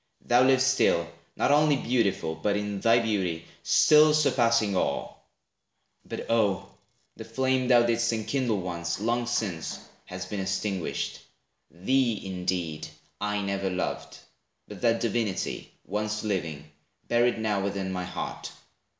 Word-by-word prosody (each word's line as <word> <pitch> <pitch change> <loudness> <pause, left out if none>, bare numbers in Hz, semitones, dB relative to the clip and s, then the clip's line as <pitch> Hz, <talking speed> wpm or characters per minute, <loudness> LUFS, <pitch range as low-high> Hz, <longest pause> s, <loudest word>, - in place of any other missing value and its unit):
Thou 120 +1 +4
livest 130 0 +4
still, 85 -9 +2 0.3
not - - +1
only 150 0 +4
beautiful, 115 -10 0
But 100 +6 -1
in 105 -1 -3
thy 115 +1 +5
beauty 95 -8 -1 0.2
still 155 0 +5
surpassing 115 -8 +2
all; - - -2 0.8
But - - -6
oh, 110 -4 +1 0.5
the - - -7
flame 130 -1 0
thou 120 -2 +6
didst 115 0 +1
enkindle 115 0 -1
once, 85 -1 -3
Long 120 +3 0
since 100 -9 -2 0.3
has 90 0 -6
been 100 +2 -5
extinguished; 95 -1 -2 0.5
thee, 115 +5 +1
indeed, 90 -4 -3 0.3
I 105 0 -1
never 100 0 -1
loved, 90 0 -4 0.5
but - - -10
that 115 -1 +2
Divinity, 115 -4 -2
Once 105 +2 -2
living, 80 -8 -3 0.4
buried 120 0 +2
now 105 -3 0
within 95 -1 -2
my 90 -1 -3
heart. - - -6
105 Hz, 130 wpm, -27 LUFS, 95-120 Hz, 0.8 s, thou